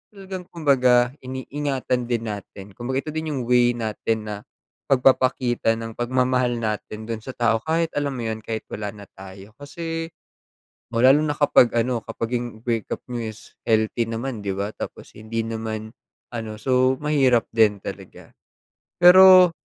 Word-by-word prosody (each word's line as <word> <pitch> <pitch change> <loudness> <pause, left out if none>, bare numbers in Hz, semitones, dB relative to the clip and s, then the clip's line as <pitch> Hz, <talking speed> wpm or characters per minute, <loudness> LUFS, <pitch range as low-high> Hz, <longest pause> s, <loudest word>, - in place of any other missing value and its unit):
talagang 190 -2 -8
kumbaga 130 -6 +3
iniingatan 130 -1 -3
din 115 -1 0
natin 100 -2 -7
kumbaga 130 +5 -3
ito 155 - -4
din 160 0 -3
yung 130 - -2
way 120 0 +3
natin 110 0 -2
na 105 -1 -4 0.5
pagpapakita 125 -3 +2
ng 115 0 -6
pagmamahal 125 0 +1
natin 110 -1 -4
dun 115 -1 -4
sa 130 - -10
tao 115 -2 +2
kahit 165 +1 0
alam 140 -2 -2
mo 120 - -4
yun, 110 0 -3
kahit 110 0 -5
wala 105 -1 -4
na 100 -1 -11
tayo 95 +2 -12
kasi, 165 +3 -5 0.8
lalo 130 +5 +5
na 150 -1 -1
kapag 135 -4 +5
ano 120 0 +1
kapag 115 +2 -4
yung 120 - -4 0.2
break 115 -3 -1
up - - -4
niyo 120 -3 -4
is 110 - -15 0.2
healthy 110 +1 +1
naman 115 0 -4
'di 95 -1 -3
ba? 100 +2 -3
Tapos - - -8
hindi 110 +1 -4
naman 110 -1 -5 0.4
ano, 110 -2 -5
so 130 0 +3
mahirap 135 -6 +3
din 105 -3 +4
talaga. - - -9 0.7
Pero 185 0 +9
120 Hz, 155 wpm, -23 LUFS, 110-135 Hz, 0.8 s, Pero